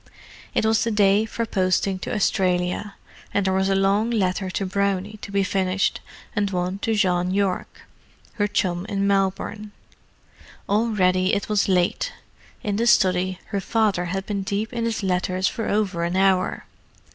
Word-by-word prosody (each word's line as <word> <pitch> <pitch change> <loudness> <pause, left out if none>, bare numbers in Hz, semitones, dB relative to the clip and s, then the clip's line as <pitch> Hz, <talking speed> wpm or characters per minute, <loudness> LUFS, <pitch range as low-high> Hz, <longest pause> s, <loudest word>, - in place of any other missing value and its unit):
It - - +2
was 220 0 +3
the 230 - 0
day 205 0 +3
for 230 +1 -3
posting 190 -1 0
to - - -5
Australia, 185 0 0 0.4
and 200 - +2
there 190 - +2
was 190 +1 +1
a 195 - +2
long 200 +3 +2
letter 190 -4 0
to 195 +1 -2
Brownie 200 +2 -1
to 200 - -8
be 200 0 +2
finished, 190 0 0 0.3
and 205 -1 +1
one 180 +1 -2
to 225 +1 0
Jean 180 -3 +1
Yorke, 195 -1 -1 0.5
her 205 -1 0
chum 190 -3 -1
in 200 -1 0
Melbourne. 200 +2 -1 0.9
Already 195 -3 +2
it 200 - -2
was 210 -2 +1
late; 180 -2 +1 0.5
in 205 -1 -1
the 235 +2 +1
study, 185 -4 +3
her 200 -2 -2
father 205 -4 +1
had 195 +2 -3
been 200 -2 -2
deep 205 +4 -3
in 230 -1 -1
his 225 -2 -2
letters 185 0 0
for 225 - -3
over 200 -5 0
an 170 +1 -1
hour. 190 -1 +2
195 Hz, 165 wpm, -23 LUFS, 185-210 Hz, 0.9 s, was